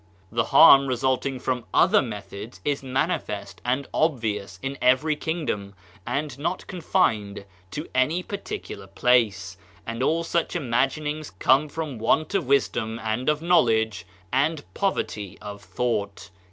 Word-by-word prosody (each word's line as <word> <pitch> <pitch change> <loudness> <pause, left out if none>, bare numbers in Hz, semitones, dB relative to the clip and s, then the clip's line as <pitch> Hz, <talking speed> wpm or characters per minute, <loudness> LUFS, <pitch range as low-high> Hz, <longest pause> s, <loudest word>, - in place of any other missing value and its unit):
The 115 0 +1
harm 140 -4 +8
resulting 130 +1 0
from 125 -1 -2
other 200 +3 +5
methods 105 0 -7
is 145 -1 0
manifest 115 - -2
and 130 +3 0
obvious 110 -11 -1
in 135 +1 -4
every 130 +5 +3
kingdom, 145 - -3 0.3
and 140 +2 -3
not 170 +5 -2
confined 105 - 0 0.2
to 150 +10 -5
any 150 +8 +1
particular 200 - -6
place; 100 -4 +1 0.3
and 115 +1 -4
all 165 +5 +1
such 170 +1 -1
imaginings 150 +2 -1
come 130 +10 +2
from 150 -5 -5
want 155 - +1
of 185 -9 0
wisdom 120 -5 +1
and 110 +5 -1
of 150 +1 0
knowledge 110 - +2 0.3
and 145 +3 +1
poverty 105 - -2
of 105 0 -8
thought. 100 -5 -3
130 Hz, 130 wpm, -25 LUFS, 110-155 Hz, 0.3 s, harm